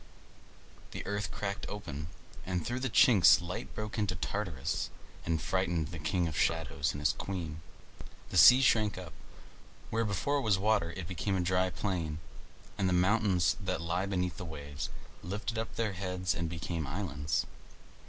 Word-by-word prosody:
The - - -6
earth 105 +1 -2
cracked 100 -1 -4
open, 75 -8 -5 0.4
and 90 -3 -2
through 120 +1 -2
the 135 0 -1
chinks 105 -6 +7
light 85 +1 -5
broke 110 +1 -4
into 100 -3 0
Tartarus, 80 -4 -2 0.4
and 80 -1 +1
frightened 85 -3 0
the 85 -1 -6
king 85 +3 0
of 80 - -4
shadows 80 -1 +1
and 70 - -6
his 75 - +3
queen. 80 -5 -5 0.7
The - - 0
sea 125 +1 +9
shrank 110 -5 +3
up. 90 -4 -8 0.8
Where 115 +1 +1
before 125 +8 0
was 105 -5 +3
water, 105 -4 +2
it 90 -3 -5
became 95 +2 -1
a - - +1
dry 90 +1 +2
plain; 85 -6 -2 0.6
and 95 -2 +2
the - - +2
mountains 90 -2 +3
that 95 -1 -1
lie 85 +3 -1
beneath 90 -3 -1
the - - -5
waves 75 -2 -6 0.3
lifted 105 +5 -3
up 115 - -4
their 110 -3 0
heads 90 -1 -1
and 85 -1 -2
became 85 -2 -3
islands. 75 -2 -1
90 Hz, 165 wpm, -32 LUFS, 80-105 Hz, 0.8 s, sea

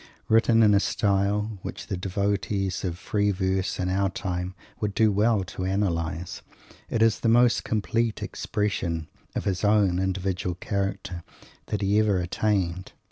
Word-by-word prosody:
Written 115 0 +5
in 105 -1 +6
a 100 - +5
style 100 +1 0
which - - -6
the - - -3
devotees 100 +1 -1
of 90 -3 -2
"free 105 +3 0
verse" 95 0 -1
in 90 - 0
our 95 +1 +1
time 90 -1 -4 0.2
would 105 -2 -2
do 110 -1 +4
well 105 0 +2
to 95 0 -6
analyse, 90 -3 -1 0.5
it 115 - +2
is 115 -2 +3
the 115 - +1
most 120 +1 +4
complete 115 +1 -1
expression 85 -6 -2 0.3
of - - -2
his 95 -1 -1
own 105 -4 +3
individual 95 -1 -1
character 95 -1 -3 0.5
that 105 -1 -2
he 100 +2 +3
ever 105 -3 +3
attained. 90 0 -1
100 Hz, 150 wpm, -26 LUFS, 90-105 Hz, 0.5 s, in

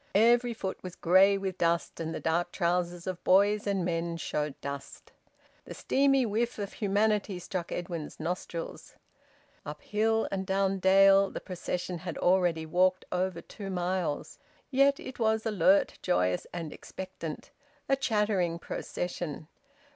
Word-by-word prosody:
Every 235 +2 +4
foot 190 -3 -4
was 185 -1 -8
grey 190 +3 +5
with 190 -2 -4
dust, 170 0 0
and 160 -1 -3
the - - -4
dark 165 +2 0
trousers 175 -1 -1
of 185 -1 -5
boys 205 +2 +4
and 195 -3 0
men 170 -1 -2
showed 150 -2 -3
dust. 140 0 -7 0.5
The - - -8
steamy 275 -1 +2
whiff 230 +3 -1
of 200 -2 -5
humanity 205 -1 +1
struck 180 -1 -5
Edwin's 170 -3 -5
nostrils. 170 0 -5 0.7
Up 150 +1 -8
hill 220 +1 +1
and 190 -1 -1
down 195 0 0
dale 195 +1 +6
the - - -6
procession 180 -1 -4
had - - -6
already 175 -3 +2
walked 185 +3 +2
over 180 -1 -1
two 200 -2 -8
miles. 180 -4 -2 0.3
Yet 275 +1 +4
it 260 - -9
was 220 -1 +1
alert, 195 -2 +3
joyous, 90 - +1
and 165 -3 -5
expectant: 185 -4 -8 0.4
a 270 - +3
chattering 210 -9 0
procession. 170 -2 -5
185 Hz, 140 wpm, -29 LUFS, 170-205 Hz, 0.7 s, dale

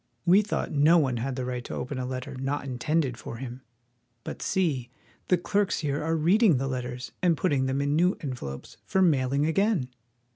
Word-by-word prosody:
We 185 +4 +6
thought 210 - -3
no 150 +4 +5
one 130 -6 +1
had 130 +3 -2
the 130 -1 -3
right 125 -1 -3
to - - -5
open 130 0 -4
a 125 - -3
letter 130 0 -5
not 135 +2 -3
intended 130 0 -1
for 115 - -7
him. 125 +1 -7 0.6
But - - -7
see! 150 -11 0 0.4
the 180 - +4
clerks 200 +3 0
here 145 -1 -1
are 165 +1 0
read 175 +8 +3
ing 190 - +6
the 135 +2 -1
letters 125 -1 -4
and 175 -3 +3
putting 140 -7 +1
them 135 +1 0
in 145 +1 +1
new 180 +4 +3
envelopes 125 - -6
for 190 - +2
mail 135 -7 +2
ing 140 +2 +2
again! 175 - +1
140 Hz, 205 wpm, -27 LUFS, 130-170 Hz, 0.6 s, We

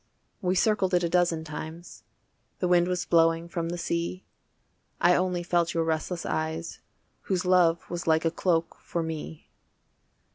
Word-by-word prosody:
We 185 0 +1
circled 190 -2 +2
it 175 - +2
a 170 - +1
dozen 175 -2 +2
times, 160 +2 -8 0.6
The 180 - -1
wind 175 0 +4
was 180 -1 -1
blowing 165 0 +3
from 170 -1 -3
the 175 - -3
sea, 170 +2 -3 0.7
I 175 - +5
only 180 -1 0
felt 170 -1 +1
your 165 - +2
restless 160 +2 -2
eyes 160 +1 -3 0.5
Whose 185 -2 0
love 175 -2 +3
was 175 0 -5
like 160 0 +3
a 165 - +2
cloak 165 -1 0
for 170 - -3
me. 160 -1 -7
170 Hz, 155 wpm, -27 LUFS, 165-180 Hz, 0.7 s, I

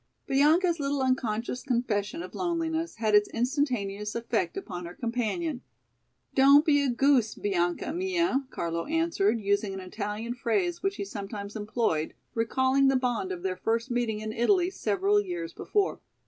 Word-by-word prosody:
Bianca's 320 +5 +3
little 280 -1 0
unconscious 250 -1 -1
confession 215 -8 -1
of 185 - -9
loneliness 330 -2 -2
had 220 -2 0
its 210 0 +5
instantaneous 230 -6 -1
effect 345 +11 -1
upon 180 - -6
her 175 - -10
companion. 245 +5 -2 0.7
"Don't 280 +3 +7
be 290 -3 +4
a 280 - +1
goose, 250 -2 +3
Bianca 175 - -1
mia," 345 -6 0
Carlo 170 -6 -3
answered, 320 -10 +1
using 200 -1 0
an - - -5
Italian 210 +4 -4
phrase 345 - -1
which 390 +1 0
he 400 - -4
sometimes 200 - -6
employed, 210 -7 -1 0.2
recalling 260 +4 +2
the 270 - +4
bond 245 -7 0
of 180 -1 -5
their 185 -1 -1
first 230 +5 -1
meeting 235 -3 -1
in 215 0 -4
Italy 355 - +2
several 400 +2 +1
years 350 -4 -5
before. 405 -1 0
245 Hz, 150 wpm, -28 LUFS, 210-320 Hz, 0.7 s, Don't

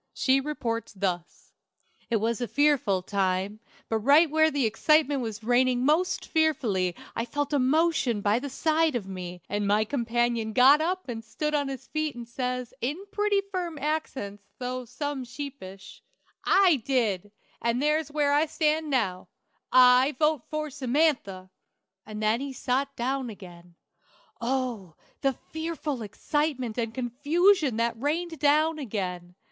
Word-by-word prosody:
She 270 0 +3
reports 240 -6 -3
thus: 185 -3 -4 0.6
"It 235 - +1
was 225 +2 0
a 240 - -1
fearful 275 -11 +2
time, 195 +1 -1 0.3
but 225 - 0
right 285 +7 +5
where 315 0 +4
the 285 -5 0
excitement 285 +5 +2
was 225 -2 -5
raining 245 +1 +2
most 325 +6 +1
fearfully 230 - +1 0.2
I 230 - -1
felt 290 +4 -3
a 285 - +3
motion 280 -3 +2
by 205 +3 +2
the 285 +2 -5
side 315 +2 +1
of 225 -5 -2
me, 180 -2 -7
and 205 0 -1
my 210 +2 +3
companion 235 -2 -1
got 270 +5 +6
up 365 +2 -2
and 225 -2 -5
stood 300 +7 -3
on 290 -2 +1
his 270 -1 -6
feet 310 -2 -2
and 240 -1 -8
says, 250 0 -3
in 275 +6 -1
pretty 415 -1 +1
firm 350 -4 -3
accents, 270 -9 -3 0.2
though 250 0 -4
some 270 +3 -4
sheepish: 240 -8 -9 0.4
"'I 375 -5 +5
did, 210 -7 0 0.3
and 235 +1 0
there's 300 +1 +1
where 290 -1 +1
I 300 +2 +3
stand 310 0 0
now; 190 -10 -1 0.4
I 255 +2 +6
vote 305 -2 +2
for 305 -1 -3
Samantha!' 255 -9 0 0.6
"And 215 0 -6
then 220 +4 +2
he 275 -1 -5
sot 270 +2 -1
down 260 +1 -2
again. 175 -4 -12 0.7
Oh, 235 -9 -2 0.3
the 270 -1 +2 0.2
fearful 315 -5 -3
excitement 255 +2 -2
and 230 -1 -1
confusion 290 - +2
that 230 0 -1
rained 325 +2 -2
down 305 +2 +3
again! 180 -8 -4
255 Hz, 150 wpm, -27 LUFS, 220-300 Hz, 0.7 s, got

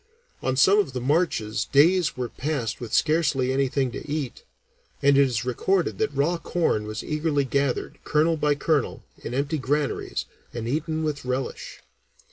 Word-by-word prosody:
On 130 - 0
some 195 +9 +6
of 175 -11 0
the 125 - -2
marches 125 -6 0
days 165 +1 +3
were 125 -1 -2
passed 130 -5 -3
with 115 -3 -6
scarcely 140 -3 +2
anything 135 -1 +1
to 145 - -8
eat, 145 -5 -3 0.6
and 140 0 +4
it 140 - +6
is 125 -4 +1
recorded 175 +9 0
that 220 - +1
raw 150 +5 0
corn 135 -14 0
was 110 +1 -5
eagerly 150 -2 0
gathered, 140 0 -1
kernel 155 +2 +2
by 150 -1 +1
kernel, 145 -1 0 0.2
in 120 - -5
empty 140 +3 -1
granaries, 145 +3 -1 0.3
and 115 -1 -4
eaten 155 +4 -1
with 150 -2 -2
a - - -10
relish. 135 - -4
140 Hz, 165 wpm, -25 LUFS, 125-155 Hz, 0.6 s, some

